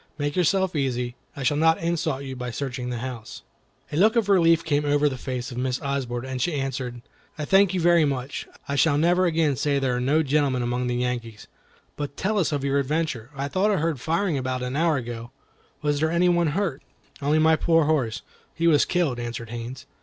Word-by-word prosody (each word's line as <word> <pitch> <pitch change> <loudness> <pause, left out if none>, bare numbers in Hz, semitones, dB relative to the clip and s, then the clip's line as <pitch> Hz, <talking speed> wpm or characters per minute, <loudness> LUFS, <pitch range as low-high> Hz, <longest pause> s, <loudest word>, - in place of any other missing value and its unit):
Make 145 -1 -2
yourself 185 +1 +2
easy. 125 -4 -1 0.2
I 140 - -5
shall 145 +3 +2
not 160 +1 +4
insult 165 -4 -1
you 135 -1 -6
by 125 -1 -5
searching 125 0 -4
the 120 - -3
house." 115 -4 -8 0.5
A 145 - -2
look 215 +5 +5
as 230 - +4
of - - -8
relief 165 -4 +4
came 150 -2 +1
over 145 0 +2
the 135 - -2
face 125 0 -5
of 120 - -5
Miss 125 0 -1
Osborne 130 -4 -3
as 130 -1 -4
she 175 +1 0
answered: 130 -3 -4 0.3
"I 150 - -3
thank 195 +2 +4
you - - +1
very 170 -1 +4
much. 135 -1 -3 0.2
I 140 - -2
shall 145 0 +3
never 175 +4 +3
say - - +3 0.5
again - - +2
there 125 -2 +1
are - - -1
no 150 +5 +2
gentlemen 140 -3 +1
among 125 +1 -1
the 125 - -1
Yankees. 120 -3 -3 0.5
But 145 -1 -5
tell 210 +2 0
us 170 - +1
of 145 -2 -1
your 140 0 +1
adventure. 140 -4 -2
I 140 +1 -2
thought 190 +8 +1
I 205 - +2
heard 160 -5 -1
firing 165 0 0
about 130 -1 -2
an 125 +1 -3
hour 160 0 +2
ago. 120 -1 -6 0.5
Was 145 -1 +1
there 160 +1 +2
any 170 +2 +3
one 175 -1 +3
hurt?" 170 -9 -1 0.4
"Only 145 +2 +2
my 160 +1 +5
poor 165 0 +3
horse; 135 -8 0 0.3
he 165 - -1
was 155 -4 +5
killed," 160 -9 0
answered 120 -1 -5
Haines. 120 +2 -6
140 Hz, 220 wpm, -25 LUFS, 125-165 Hz, 0.5 s, look